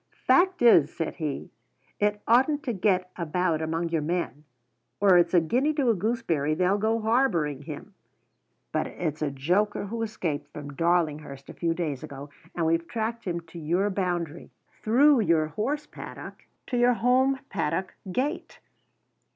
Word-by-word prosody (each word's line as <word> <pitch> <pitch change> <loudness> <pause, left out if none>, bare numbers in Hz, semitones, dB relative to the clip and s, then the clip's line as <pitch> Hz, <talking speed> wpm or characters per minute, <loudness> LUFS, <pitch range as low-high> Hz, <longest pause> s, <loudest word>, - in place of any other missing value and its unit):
"Fact 365 -5 +4
is," 165 -11 +6
said 165 - -4
he, 150 -4 -4 0.5
"it 210 0 0
oughtn't 265 +6 +3
to 250 -6 -2
get 185 -2 +1
about 170 -1 0
among 165 +2 -2
your 165 -2 0
men, 150 -3 -3 0.5
or 195 -2 +5
it's 175 0 +4
a - - +8
guinea 250 - +1
to 275 -6 +2
a - - +3
gooseberry 175 -8 0
they'll 185 +4 +2
go 220 +2 +1
harbouring 215 - +1
him. 150 +7 -9 0.8
But - - -1
it's 155 -3 -4
a 150 - +1
joker 180 +11 0
who 225 +3 -4
escaped 170 -10 -3
from 145 -1 -8
Darlinghurst 155 -4 -1
a - - -7
few 165 -1 -1
days 155 -7 -3
ago. 140 +1 -9 0.2
And 170 - 0
we've 165 +1 +1
tracked 230 +5 -3
him 170 -2 -2
to 170 +1 -11
your 175 +6 0
boundary 175 -4 -3 0.3
through 270 +5 +5
your 165 -7 +2
horse 285 - -2
paddock - - -10 0.2
to 250 - -2
your 245 +1 +5
home 255 +3 +3
paddock 185 +1 -2 0.2
gate!" 285 - -3
180 Hz, 160 wpm, -26 LUFS, 160-225 Hz, 0.8 s, a